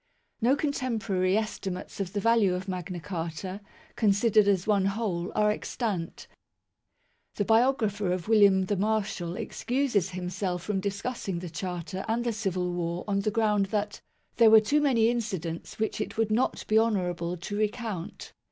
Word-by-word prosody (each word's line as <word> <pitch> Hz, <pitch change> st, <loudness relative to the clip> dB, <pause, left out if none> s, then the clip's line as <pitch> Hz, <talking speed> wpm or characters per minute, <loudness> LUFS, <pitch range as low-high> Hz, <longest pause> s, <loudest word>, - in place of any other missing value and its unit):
No 250 Hz, +4 st, +4 dB
contemporary 225 Hz, -, 0 dB
estimates 205 Hz, -4 st, -4 dB
of 190 Hz, -2 st, -3 dB
the 205 Hz, -, 0 dB
value 215 Hz, -3 st, +3 dB
of 185 Hz, +1 st, -5 dB
Magna 185 Hz, -1 st, -4 dB
Carta, 170 Hz, +2 st, -5 dB, 0.3 s
considered 215 Hz, 0 st, +3 dB
as 190 Hz, -3 st, +2 dB
one 200 Hz, -3 st, +2 dB
whole, 195 Hz, -4 st, -1 dB
are 210 Hz, 0 st, +3 dB
extant. 210 Hz, -6 st, -3 dB, 1.1 s
The 205 Hz, -, 0 dB
biographer 220 Hz, -4 st, +2 dB
of 180 Hz, 0 st, -2 dB
William 200 Hz, -4 st, +5 dB
the 205 Hz, -, 0 dB
Marshal 200 Hz, -4 st, -1 dB
excuses 240 Hz, -5 st, -1 dB
himself 180 Hz, 0 st, -3 dB
from 205 Hz, -2 st, -1 dB
discussing 200 Hz, 0 st, -3 dB
the 175 Hz, -1 st, -6 dB
Charter 180 Hz, +2 st, -4 dB
and 230 Hz, +2 st, 0 dB
the 235 Hz, -1 st, -1 dB
Civil 185 Hz, -4 st, -1 dB
War 170 Hz, 0 st, -2 dB
on 200 Hz, -1 st, +1 dB
the 200 Hz, -, 0 dB
ground 210 Hz, -2 st, +2 dB
that 210 Hz, +1 st, -2 dB, 0.2 s
" -, -, -43 dB
there 230 Hz, -2 st, +7 dB
were 220 Hz, 0 st, +9 dB
too 285 Hz, +8 st, +1 dB
many 245 Hz, -6 st, +3 dB
incidents 190 Hz, -9 st, -3 dB
which 220 Hz, 0 st, -1 dB
it -, -, -5 dB
would 225 Hz, -1 st, +1 dB
not 230 Hz, +4 st, 0 dB
be 215 Hz, +1 st, +4 dB
honourable 180 Hz, -6 st, 0 dB
to 180 Hz, +4 st, -5 dB
recount 210 Hz, -4 st, -3 dB
200 Hz, 160 wpm, -28 LUFS, 180-220 Hz, 1.1 s, were